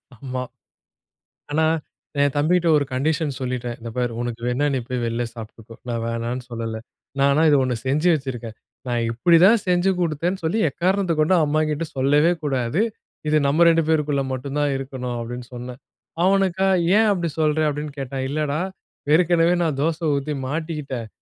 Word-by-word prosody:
ஆமா. 130 Hz, +1 st, -5 dB, 1.1 s
ஆனா, 160 Hz, +2 st, +2 dB, 0.6 s
என் 145 Hz, -1 st, +3 dB
தம்பிகிட்ட 170 Hz, +3 st, +2 dB
ஒரு 145 Hz, -, 0 dB
கண்டிஷன் 150 Hz, +2 st, 0 dB
சொல்லிட்டேன். 125 Hz, -2 st, -3 dB
இந்த 115 Hz, 0 st, -6 dB
பாரு 120 Hz, -1 st, 0 dB
உனக்கு 120 Hz, -1 st, -4 dB
வேணும்னா 130 Hz, +4 st, +1 dB
நீ -, -, +1 dB
போய் 125 Hz, -1 st, -2 dB
வெளில 115 Hz, +1 st, -1 dB
சாப்பிட்டுக்கோ, 115 Hz, 0 st, -10 dB
நான் 115 Hz, -1 st, -2 dB
வேணாம்னு 115 Hz, +2 st, -3 dB
சொல்லல. 115 Hz, -1 st, -4 dB, 0.5 s
ஆனா 145 Hz, +3 st, +3 dB
இது 145 Hz, -, +5 dB
ஒண்ணு 125 Hz, -1 st, -1 dB
செஞ்சு 150 Hz, +6 st, +2 dB
வச்சிருக்கேன். 120 Hz, -6 st, -5 dB, 0.3 s
நான் 120 Hz, -1 st, 0 dB
இப்படித்தான் 175 Hz, -, +5 dB
செஞ்சு 180 Hz, +1 st, +3 dB
கொடுத்தேன்னு 170 Hz, +3 st, -1 dB
சொல்லி 175 Hz, +8 st, 0 dB
எக்காரணத்தைக் 180 Hz, +1 st, 0 dB
கொண்டும் 165 Hz, +1 st, +4 dB
அம்மாகிட்ட 155 Hz, +1 st, 0 dB
சொல்லவே 145 Hz, +6 st, +3 dB
கூடாது. 135 Hz, -, 0 dB, 0.5 s
இது 155 Hz, -, +3 dB
நம்ம 155 Hz, +5 st, +4 dB
2 165 Hz, 0 st, +4 dB
பேருக்குள்ள 150 Hz, -3 st, +1 dB
மட்டும்தான் 140 Hz, +3 st, -1 dB
இருக்கணும் 130 Hz, -2 st, -5 dB
அப்படின்னு 120 Hz, +1 st, -6 dB
சொன்னேன். 125 Hz, +1 st, -8 dB, 0.4 s
அவனுக்கா 190 Hz, -1 st, +2 dB, 0.3 s
"ஏன் 220 Hz, 0 st, +4 dB
அப்படி 170 Hz, -3 st, -1 dB
சொல்ற?" 155 Hz, 0 st, +2 dB
அப்படின்னு 150 Hz, 0 st, -4 dB
கேட்டான். 135 Hz, 0 st, -3 dB
இல்லடா, 150 Hz, +1 st, -1 dB, 0.5 s
ஏற்கனவே 170 Hz, 0 st, +4 dB
நான் 155 Hz, -5 st, 0 dB
தோசை 165 Hz, +1 st, -1 dB
ஊத்தி 145 Hz, +2 st, -3 dB
மாட்டிக்கிட்டேன். 145 Hz, -6 st, -4 dB
145 Hz, 150 wpm, -22 LUFS, 125-165 Hz, 1.1 s, இது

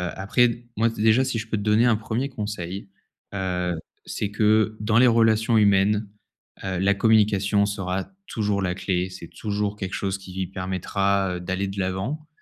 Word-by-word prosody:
après 100 Hz, +6 st, +3 dB
d 120 Hz, +1 st, -8 dB
moi 115 Hz, +2 st, +3 dB
déjà 110 Hz, +3 st, +3 dB
si 115 Hz, -, -2 dB
je 110 Hz, -, -6 dB
peux 110 Hz, -, -1 dB
te 105 Hz, -, -3 dB
donner 105 Hz, +3 st, +4 dB
un 120 Hz, -2 st, +4 dB
1er 115 Hz, +5 st, -2 dB
conseil, 100 Hz, -4 st, -5 dB, 0.4 s
heu, 90 Hz, -2 st, -1 dB, 0.3 s
c'est 100 Hz, -, -3 dB
que 110 Hz, +1 st, +2 dB
dans 110 Hz, +1 st, +1 dB
les 125 Hz, +2 st, +7 dB
relations 115 Hz, 0 st, +3 dB
humaines, 105 Hz, 0 st, +3 dB, 0.5 s
heu, 95 Hz, -2 st, -2 dB
la 100 Hz, +1 st, +3 dB
communication 105 Hz, -1 st, +3 dB
sera 95 Hz, -2 st, -3 dB, 0.2 s
toujours 105 Hz, -2 st, -1 dB
la 90 Hz, -1 st, 0 dB
clé, 95 Hz, -1 st, -1 dB
c'est 90 Hz, -2 st, -10 dB
toujours 105 Hz, -1 st, -3 dB
quelque 100 Hz, -2 st, -5 dB
chose 95 Hz, -1 st, -2 dB
qui 95 Hz, -1 st, -5 dB
permettra 95 Hz, 0 st, -1 dB
d'aller 95 Hz, +2 st, -2 dB
de 100 Hz, +1 st, -5 dB
l'avant, 95 Hz, +12 st, -3 dB
100 Hz, 170 wpm, -24 LUFS, 95-110 Hz, 0.5 s, les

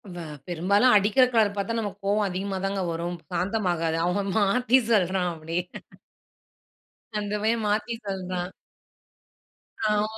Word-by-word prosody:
வ -, -, -8 dB, 0.3 s
பெரும்பாலும் 200 Hz, +8 st, +3 dB
அடிக்கிற 205 Hz, +6 st, +4 dB
கலர் 215 Hz, -3 st, +3 dB
பார்த்தா 200 Hz, +3 st, -1 dB
நமக்கு 205 Hz, -2 st, -5 dB
கோவம் 205 Hz, 0 st, +2 dB
அதிகமா 190 Hz, +1 st, -3 dB
தாங்க 195 Hz, 0 st, -1 dB
வரும். 170 Hz, +1 st, -3 dB
சாந்தமாகாது 180 Hz, -5 st, 0 dB
அவன் 195 Hz, +2 st, 0 dB
மாத்தி 245 Hz, +5 st, +4 dB
சொல்றான் 185 Hz, -3 st, +2 dB
அப்டி. 165 Hz, +1 st, -5 dB, 1.6 s
அந்த 205 Hz, 0 st, -3 dB
பையன் 225 Hz, 0 st, +1 dB
மாத்தி 215 Hz, +3 st, 0 dB
சொல்றான். 185 Hz, -2 st, -3 dB, 1.4 s
ஆமா. 210 Hz, 0 st, +2 dB
200 Hz, 120 wpm, -26 LUFS, 180-210 Hz, 1.6 s, அடிக்கிற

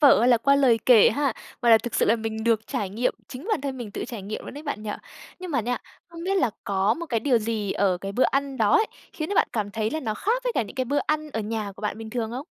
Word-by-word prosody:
vở 280 Hz, -7 st, +7 dB
hay 245 Hz, -, +4 dB
là 240 Hz, -2 st, +5 dB
qua 280 Hz, +4 st, +4 dB
lời 250 Hz, -5 st, +4 dB
kể 235 Hz, -5 st, +7 dB
ha, 275 Hz, +1 st, 0 dB, 0.3 s
mà 235 Hz, -, +4 dB
là 225 Hz, -, +8 dB
thực 235 Hz, +1 st, -6 dB
sự -, -, +3 dB
là 230 Hz, -, +4 dB
mình 220 Hz, 0 st, -4 dB
được 225 Hz, -2 st, +2 dB
trải 200 Hz, -2 st, -3 dB
nghiệm, 230 Hz, +5 st, 0 dB
chính 275 Hz, +9 st, -8 dB
bản 430 Hz, -, +1 dB
thân 275 Hz, -2 st, -4 dB
mình 240 Hz, -5 st, -6 dB
tự -, -, -4 dB
trải 230 Hz, -4 st, -7 dB
nghiệm 210 Hz, +3 st, -6 dB
luôn -, -, -8 dB
đấy 290 Hz, -, -8 dB
bạn 285 Hz, -8 st, -4 dB
nhỉ? 215 Hz, -, -4 dB, 0.5 s
Nhưng 365 Hz, -1 st, -7 dB
mà 275 Hz, -, +1 dB
nha, 245 Hz, +3 st, -2 dB, 0.3 s
không 335 Hz, 0 st, -9 dB
biết 390 Hz, +1 st, 0 dB
là 255 Hz, -11 st, +2 dB
có 200 Hz, +2 st, +2 dB
một 340 Hz, +4 st, -6 dB
cái 230 Hz, -6 st, 0 dB
điều 245 Hz, -2 st, +3 dB
gì 215 Hz, -2 st, -2 dB
ở 190 Hz, -3 st, +1 dB
cái 195 Hz, +1 st, -5 dB
bữa 250 Hz, -, +3 dB
ăn 275 Hz, -1 st, -1 dB
đó 215 Hz, -3 st, +2 dB
ấy, 440 Hz, -, +5 dB, 0.3 s
khiến 310 Hz, 0 st, -4 dB
cho 405 Hz, -, -2 dB
bạn -, -, +3 dB
cảm 210 Hz, -3 st, -2 dB
thấy 220 Hz, 0 st, -1 dB
là 315 Hz, -, -2 dB
nó 220 Hz, -6 st, -2 dB
khác 470 Hz, -, 0 dB
với -, -, 0 dB
cả -, -, +2 dB
những 205 Hz, -, -10 dB
cái 260 Hz, -1 st, -1 dB
bữa 285 Hz, +3 st, 0 dB
ăn 305 Hz, 0 st, -1 dB
ở 225 Hz, -, -2 dB
nhà 215 Hz, -1 st, -3 dB
của 195 Hz, -, -15 dB
bạn 210 Hz, +1 st, -2 dB
bình 220 Hz, -1 st, -7 dB
thường 230 Hz, -2 st, -2 dB
không? 260 Hz, +4 st, -5 dB
235 Hz, 310 wpm, -25 LUFS, 215-280 Hz, 0.5 s, là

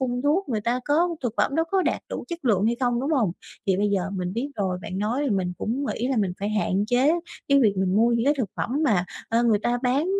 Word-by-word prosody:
phun 245 Hz, -1 st, -1 dB
thuốc, 305 Hz, +5 st, +1 dB
người 220 Hz, -4 st, -1 dB
ta 240 Hz, +4 st, 0 dB
có 320 Hz, +5 st, +3 dB
thực 245 Hz, -, -1 dB
phẩm -, -, +1 dB
đó 325 Hz, +2 st, +2 dB
có 385 Hz, -1 st, +2 dB
đạt -, -, 0 dB
đủ -, -, -5 dB
chất 340 Hz, -3 st, -6 dB
lượng 205 Hz, -5 st, +3 dB
hay 235 Hz, +1 st, +1 dB
không, 245 Hz, -2 st, +1 dB
đúng 275 Hz, +4 st, -2 dB
hông? 235 Hz, -, +2 dB, 0.3 s
Thì 190 Hz, -2 st, +3 dB
bây 205 Hz, +2 st, +1 dB
giờ 195 Hz, -1 st, 0 dB
mình 180 Hz, -2 st, -3 dB
biết 245 Hz, +7 st, -2 dB
rồi, 190 Hz, -3 st, -1 dB
bạn 185 Hz, -, -5 dB
nói 230 Hz, +7 st, 0 dB
thì 275 Hz, -, 0 dB
mình 185 Hz, -3 st, 0 dB
cũng 255 Hz, +6 st, -2 dB
nghĩ 245 Hz, -, -2 dB
là 265 Hz, -, 0 dB
mình 200 Hz, -5 st, +1 dB
phải 205 Hz, -, -1 dB
hạn 205 Hz, -2 st, +1 dB
chế 255 Hz, +6 st, +3 dB, 0.4 s
cái 280 Hz, 0 st, +5 dB
việc 215 Hz, -5 st, +4 dB
mình 190 Hz, 0 st, +1 dB
mua 230 Hz, +2 st, +5 dB
những 235 Hz, 0 st, +1 dB
cái 290 Hz, +2 st, +4 dB
thực 220 Hz, -8 st, -1 dB
phẩm -, -, -2 dB
mà, 200 Hz, -9 st, +2 dB, 0.2 s
ờ, 230 Hz, +1 st, +2 dB
người 225 Hz, -3 st, +3 dB
ta 240 Hz, +3 st, 0 dB
bán, 265 Hz, +5 st, +1 dB
235 Hz, 275 wpm, -25 LUFS, 200-270 Hz, 0.4 s, cái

